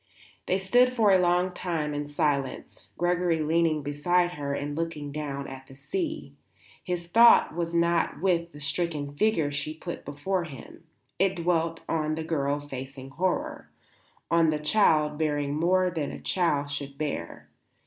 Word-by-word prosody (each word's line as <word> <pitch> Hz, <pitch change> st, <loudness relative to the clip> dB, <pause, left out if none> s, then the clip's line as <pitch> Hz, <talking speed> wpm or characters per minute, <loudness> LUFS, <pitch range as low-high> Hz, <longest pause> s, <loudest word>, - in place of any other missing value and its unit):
They 185 Hz, -, +2 dB
stood 245 Hz, +7 st, +3 dB
for 215 Hz, -4 st, +4 dB
a 190 Hz, -, +6 dB
long 180 Hz, +1 st, +2 dB
time 160 Hz, -5 st, -2 dB
in 145 Hz, 0 st, -3 dB
silence, 145 Hz, -2 st, -2 dB
Gregory 175 Hz, -1 st, +1 dB
leaning 160 Hz, -1 st, +1 dB
beside 175 Hz, +5 st, +1 dB
her 140 Hz, -4 st, -3 dB
and 145 Hz, +1 st, -4 dB
looking 160 Hz, -3 st, -4 dB
down 140 Hz, -2 st, -4 dB
at 135 Hz, 0 st, -10 dB
the 135 Hz, -, -14 dB
sea. 320 Hz, -, -4 dB, 0.5 s
His 175 Hz, -2 st, -3 dB
thought 230 Hz, +4 st, +6 dB
was 170 Hz, 0 st, -2 dB
not 170 Hz, 0 st, +1 dB
with 170 Hz, -2 st, +1 dB
the 145 Hz, -, -12 dB
stricken 145 Hz, 0 st, -2 dB
figure 165 Hz, -6 st, +2 dB
she 145 Hz, +2 st, -3 dB
put 170 Hz, +2 st, -7 dB
before 170 Hz, +6 st, -2 dB
him; 155 Hz, +2 st, -11 dB, 0.3 s
it 190 Hz, 0 st, +2 dB
dwelt 165 Hz, -1 st, 0 dB
on 155 Hz, -1 st, 0 dB
the 160 Hz, -, -4 dB
girl 145 Hz, -3 st, 0 dB
facing 135 Hz, -1 st, -8 dB
horror, 185 Hz, +6 st, -2 dB, 0.6 s
on 165 Hz, -1 st, +4 dB
the 155 Hz, -, +1 dB
child 150 Hz, -3 st, +2 dB
bearing 145 Hz, -2 st, 0 dB
more 180 Hz, +4 st, +2 dB
than 155 Hz, -4 st, -2 dB
a -, -, -7 dB
child 145 Hz, -6 st, 0 dB
should 140 Hz, -1 st, -5 dB
bear. 140 Hz, -, -4 dB
160 Hz, 160 wpm, -27 LUFS, 145-175 Hz, 0.6 s, a